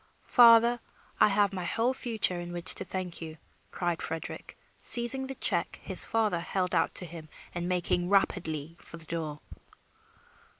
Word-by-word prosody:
"Father, 235 0 +6 0.4
I - - +6
have 205 -1 +1
my 185 -2 -4
whole 230 +8 0
future 220 -8 -1
in 175 0 -7
which 175 0 +1
to - - -2
thank 185 -2 -5
you," 160 -1 -8 0.3
cried 175 -2 -3
Frederick, 165 0 -7 0.2
seizing 250 +3 +3
the 270 - -6
check - - -1
his - - +3
father 215 -6 0
held 180 +2 -3
out - - 0
to 180 - +4
him 165 -2 -10 0.2
and 175 0 -4
making 175 0 0
rapidly 165 -6 0
for 165 - -10
the 160 - -7
door. 155 -3 -5
180 Hz, 160 wpm, -28 LUFS, 170-225 Hz, 0.4 s, Father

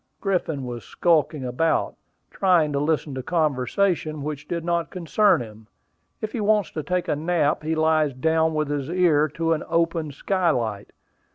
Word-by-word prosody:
Griffin 170 -8 -1
was 120 -3 -6
skulking 155 - +1
about, 130 +7 0 0.4
trying 175 -6 +3
to 140 - 0
listen 150 -1 0
to 130 - -4
conversation 155 +2 0
which 145 -1 -5
did 170 -1 -3
not 170 -1 0
concern 185 +1 +2
him. 110 -1 -13 0.5
If 215 -1 -3
he 235 - -3
wants 210 -2 +2
to 155 - -4
take 180 +4 -2
a 150 - +1
nap, 155 -1 0
he 160 +1 -1
lies 155 -3 +2
down 160 +3 +1
with 155 -1 -1
his 145 -1 -2
ear 165 -4 +3
to 165 0 +1
an 155 - -2
open 165 -2 0
skylight. 135 - -1
160 Hz, 165 wpm, -24 LUFS, 145-170 Hz, 0.5 s, trying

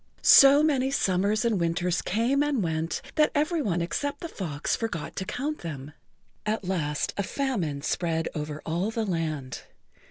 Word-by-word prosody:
So 280 +1 +8
many 270 -4 +2
summers 205 -3 +1
and 225 -5 +1
winters 175 +1 0
came 235 +8 +1
and 290 -7 +1
went 160 0 -2
that 305 -1 +5
every 310 +3 +1
one 175 -8 0
except 285 +11 -3
the 335 - -4
fox 160 - -3
forgot 220 -9 -4
to 190 - -2
count 290 +9 -3
them. 145 -3 -7 0.5
At 215 0 -1
last 155 -6 -1
a - - +1
famine 190 - -2
spread 165 0 -1
over 150 0 -5
all 175 +6 -1
the 225 0 -2
land. 155 - -3
190 Hz, 160 wpm, -27 LUFS, 165-265 Hz, 0.5 s, So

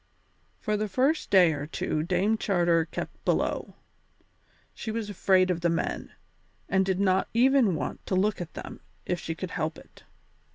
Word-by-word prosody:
For 210 0 -1
the 215 +1 -1
first 270 +10 +1
day 180 -4 +6
or 145 0 -5
two 155 -1 -2
Dame 185 +6 +1
Charter 175 -6 +2
kept - - -7
below. - - -1 1.0
She - - -6
was 220 -1 -3
afraid 185 -1 +3
of 170 -1 -2
the 170 - +2
men, 165 - -2 0.6
and 190 0 +2
did 190 -1 -1
not 190 -1 +2
even 250 -5 +4
want - - -4
to 190 - 0
look 200 +1 +1
at 170 - -7
them - - -8 0.3
if 180 -1 -1
she 165 - -4
could 180 +1 -6
help 155 +1 -2
it. - - -16
185 Hz, 170 wpm, -27 LUFS, 170-210 Hz, 1.0 s, day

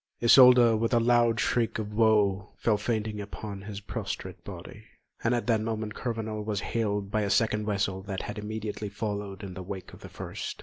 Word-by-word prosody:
Isolda, 125 -1 +7
with 115 +2 +1
a - - +5
loud 120 -1 +3
shriek 120 -2 +1
of 105 -1 -4
woe, 105 -2 +2
fell 110 -3 +2
fainting 110 -1 -2
upon 100 0 -7
his 100 0 -7
prostrate 100 - -5
body, - - -9 0.4
and 120 +2 +2
at 120 - -2
that 115 -3 +2
moment 110 -1 -3
Kurvenal 110 -3 -3
was 105 -2 -2
hailed 105 -3 -2
by 110 - +1
a 100 - -1
second 105 +1 +1
vessel 100 -2 -1
that 95 -2 -3
had 105 +1 -5
immediately 105 0 -4
followed 100 -1 -4
in 95 -2 -6
the 95 - -7
wake 95 0 -7
of - - -12
the - - -10
first. - - -6
105 Hz, 190 wpm, -28 LUFS, 100-115 Hz, 0.4 s, Isolda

